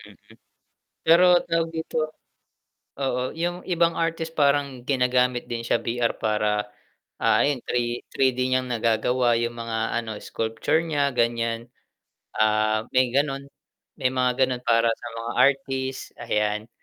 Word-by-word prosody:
Mm. - - -15 0.9
Pero 170 +2 +7 0.2
tawag 165 -1 0
dito 160 0 -4 1.0
Oo 130 -2 -1
'yung 175 +2 -3
ibang 170 -2 +1
artist 165 0 -2
parang 140 -3 +1
ginagamit 125 -1 +1
din 120 -1 -4
siya, 115 0 +1
VR 120 0 -1
para, 105 -1 0 0.5
ah, - - +3
ayon 140 -3 0
3- 120 0 -1
3D 130 -2 +1
niyang 130 0 +1
nagagawa 120 +1 +2
'yung 120 0 -1
mga 115 0 -2
ano 110 -2 -6
sculpture 115 +8 -1
niya 145 -4 0
ganiyan, 115 -1 -1 0.7
ah, 110 0 +2
may 130 -1 +3
ganun, 140 +1 -1 0.5
may 130 -3 0
mga 125 0 +2
gano'n 125 -1 -4
para 115 -1 +3
sa - - -9
mga 115 +1 -4
artist, 135 -1 0
ayan. 105 -1 -1
125 Hz, 130 wpm, -24 LUFS, 115-140 Hz, 1.0 s, Pero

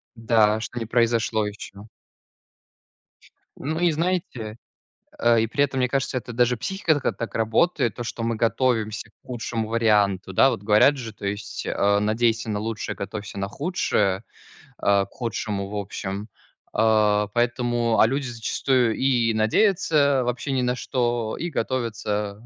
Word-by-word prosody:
Да, 110 -2 +3
что 120 +2 -5
не 115 - -3
произошло 115 -1 +1
ещё. 105 0 -9 1.7
Ну, 160 +4 -3
и 175 -1 +3
знаете, 155 -10 -2 0.6
э, 115 -1 +4
и 115 - 0
при 140 +5 +1
этом, 135 -2 -1
мне 125 -1 +1
кажется, 135 0 -1
это 120 -1 -6
даже 120 +1 +2
психика 190 - 0
так 145 - -5
а, - - +3
так 115 - -6
работает, 115 - +1
то, 120 - -5
что 115 0 -5
мы 115 0 0
готовимся 115 -1 0
к - - -34
худшему 115 -2 -3
варианту. 105 -4 +2
Да, 135 - +5
вот, 105 - -4
говорят 110 +7 +5
же, 115 -4 -6
то 105 - -9
есть, 100 +1 -4
а, 100 0 +2
надейся 115 +2 +1
на 105 -1 -1
лучшее, 110 0 -4
готовься 100 0 -6
на 100 - -2
худшее, 105 - 0 0.5
а, 100 -1 +2
к - - -24
худшему, 105 -5 -3
в 105 - -6
общем. 100 0 -4 0.5
А, 105 -1 +3
поэтому, 120 -2 +1
а, - - +7
люди 135 +2 -2
зачастую 120 +1 0
и 120 -4 +2
надеются, 140 - +3
вообще, 125 +3 -2
ни 130 -1 +1
на 125 0 0
что, 120 -4 -1
и 175 - -3
готовятся 105 -7 -2
115 Hz, 160 wpm, -24 LUFS, 105-125 Hz, 1.7 s, а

